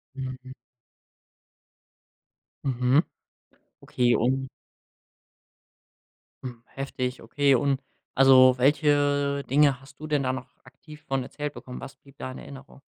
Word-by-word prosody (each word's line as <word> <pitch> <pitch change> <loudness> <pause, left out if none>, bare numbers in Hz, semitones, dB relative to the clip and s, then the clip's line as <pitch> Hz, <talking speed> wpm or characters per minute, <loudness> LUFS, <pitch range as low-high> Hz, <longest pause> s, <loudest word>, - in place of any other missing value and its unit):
Mhm. 130 -1 -7 2.1
Mhm, 130 +3 +3 0.8
okay 120 -1 +1
und 130 +3 0 2.0
Hm, 120 -3 -7
heftig, 130 -2 -5
okay. 140 +4 +2
Und 135 +1 +1 0.3
also, 130 -1 +7
welche 145 0 +2
Dinge 140 -1 +4
hast 135 +1 -18
du 155 - -7
denn 150 -2 +1
da 130 0 0
noch 130 -1 -6 0.2
aktiv 150 +4 -15
von 135 -1 -1
erzählt 150 +3 -6
bekommen? 125 - -9
Was 135 0 -9
blieb 140 0 -21
da 130 - -6
in - - -9
Erinnerung? 135 0 -12
135 Hz, 115 wpm, -26 LUFS, 130-140 Hz, 2.1 s, also